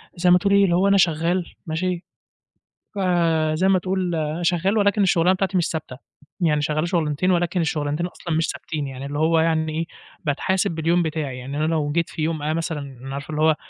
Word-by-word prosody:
زَي 180 +1 +2
ما 180 - +8
تقول 200 +2 +1
إيه، 200 0 +6
اللي 175 -3 +3
هو 190 +3 +3
أنا 200 0 +4
شغال 170 +1 +2 0.2
ماشي، 175 +2 -2 0.9
فزَي 170 -2 +1
ما 190 -1 +4
تقول 185 -2 -1
أنا 155 +2 -2
شغال 180 +4 +1
ولكن 205 0 +3
الشُغلانة 180 0 +3
بتاعتي 195 0 0
مش 175 - +2
ثابتة، 155 -5 -5 0.4
يعني 150 -3 +2
شغال 155 +3 -1
شُغلانتين، 170 0 +1
ولكن 175 0 +1
الشُغلانتين 150 +1 -1
أصلًا 170 -2 -6
مش 160 - +1
ثابتين، 150 -3 -4
يعني 135 0 -7
اللي 145 +1 -4
هو 160 +1 +3
يعني 160 -1 +1
إيه، 165 - -1 0.4
باتحاسب 175 +6 0
باليوم 165 +2 +1
بتاعي، 150 -5 -3
يعني 135 +3 -6
أنا 155 - +1
لو 155 -3 0
جيت 170 +2 0
في 165 - -6
يوم 160 -1 -1
أنا 155 +1 0
مثلًا 140 -5 -5
عارف 140 +2 -7
اللي 155 0 -2
هو 155 0 +4
165 Hz, 200 wpm, -22 LUFS, 155-180 Hz, 0.9 s, ما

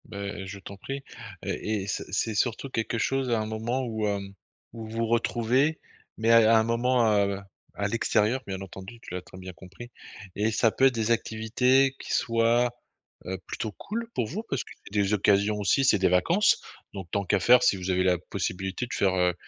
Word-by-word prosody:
Bah 105 - -10
heu, 100 -1 -5
je 100 +1 -8
t'en 100 +1 -10
prie 135 +7 -6 0.4
et 105 -2 -2
et - - -8
c'est - - -3
c'est 110 +3 0
surtout 120 +5 -1
quelque 115 -2 -2
chose 135 +3 0
à 115 -2 +2
un 110 - -2
moment 110 +4 -2
où 110 -2 -2
hem, 100 -1 -3 0.4
où 115 -2 -7
vous 115 +1 -2
retrouvez, 120 +6 +1 0.4
mais 115 +1 +2
à 115 -1 +6
à - - +7
un - - +2
moment, 120 +1 +2 0.2
heu, 100 0 -2 0.4
à 100 - -1
l'extérieur 115 +2 +1
bien 95 -1 -4
entendu, 95 +4 -10
tu - - -10
l'as 90 - -3
très 90 +1 -14
bien 95 0 -8
compris 95 +8 -12 0.4
et 105 +2 +1
ça 110 +1 +3
peut 135 - +2
être 130 - +1
des 115 0 0
activités 125 +4 +2
qui - - -7
soient, 115 +1 +2 0.5
heu, 95 +1 -3
plutôt 110 - -4
cool 230 - -5
pour 115 - 0
vous. 200 - -5
Parce 135 - -1
que, - - -15 0.2
des 100 0 +1
occasions 100 +1 +3
aussi 120 +7 +2
c'est 105 -6 +4
des 95 - +3
vacances. 165 - +3 0.3
Donc 95 -4 -7
tant 100 - 0
qu'à 100 +2 +2
faire 125 +6 +6
si 100 - +3
vous 95 0 -3
avez 90 0 +2
la 90 -1 +3
possibilité 95 +4 -4
de - - -7
faire, 95 -2 +1
heu, 90 -1 +2
110 Hz, 210 wpm, -27 LUFS, 100-120 Hz, 0.5 s, à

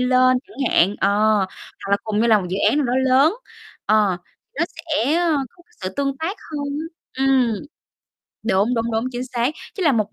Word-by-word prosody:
lên 255 0 +4
chẳng 395 - -17
hạn, 195 +4 +4
ờ, - - +3 0.8
hoặc - - -5
là 200 - +5
cùng 215 -1 -1
nhau 235 - +3
làm 215 -2 +5
một 180 - -5
dự 185 - -1
án - - 0
nào 285 - +1
đó 240 - 0
lớn, 270 +7 +4 0.5
ờ, 210 -4 +3 0.4
nó 335 - +3
sẽ, 310 -4 -1
ơ, 340 -3 +2
có 345 - -22 0.2
sự 185 - -2
tương 275 -1 -1
tác 330 +8 -3
hơn 295 -2 -3 0.5
á, 265 - -1
ừm. 260 -4 +3 0.9
Đúng, 210 +3 +2
đúng, 230 0 -1
đúng, 225 +1 0
chính 245 +1 -3
xác, 245 0 -1 0.2
chứ 390 - -4
làm 290 -8 +3
một 215 -1 -1
255 Hz, 200 wpm, -21 LUFS, 220-290 Hz, 0.9 s, là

